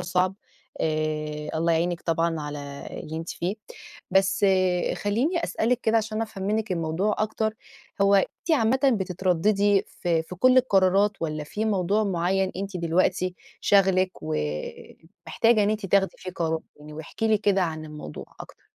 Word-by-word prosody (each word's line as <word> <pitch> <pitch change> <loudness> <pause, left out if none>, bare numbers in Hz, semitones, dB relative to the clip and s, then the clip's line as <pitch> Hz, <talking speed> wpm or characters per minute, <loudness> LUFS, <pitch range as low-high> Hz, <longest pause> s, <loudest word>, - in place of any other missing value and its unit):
صعب، 180 +1 0 0.5
آآ 155 -1 -2
الله 165 +1 +2
يعينِك 170 +1 0
طبعًا 165 -1 0
على 145 -1 -7
اللي 160 +1 -7
أنتِ 165 +1 -5
فيه. 180 +4 -2 0.6
بس 195 +1 +3 0.5
خلّيني 270 - 0
أسألِك 240 +2 0
كده 225 -1 +2
عشان 220 0 -1
أفهم 215 -4 -6
منِك 215 0 0
الموضوع 170 +5 0
أكتر. 220 0 -1 0.5
هو 200 0 +5
أنتِ 195 - 0
عامةً 260 -4 +3 0.2
بتترددي 190 +2 +2
في 165 -2 -1
في 165 - -9
كل 255 +8 +4
القرارات 200 -4 +4
والّا 155 -2 -3
في 210 +8 -3
موضوع 205 0 +1
معيّن 190 0 0
أنتِ 195 0 -4
دلوقتي 180 +2 +1 0.3
شاغلِك 190 -2 +3
ومحتاجة 80 - -1
إن 205 - +2
أنتِ 215 -2 -2
تاخدي 195 0 +2
فيه 185 - -7
قرار؟ 160 -1 -1 0.2
يعني 150 +1 -12
واحكي 160 +8 -3
لي 215 -1 +4
كده 200 -2 +2
عن 160 -2 -3
الموضوع 150 - -8 0.2
أكتر. - - -12
185 Hz, 145 wpm, -25 LUFS, 160-210 Hz, 0.6 s, هو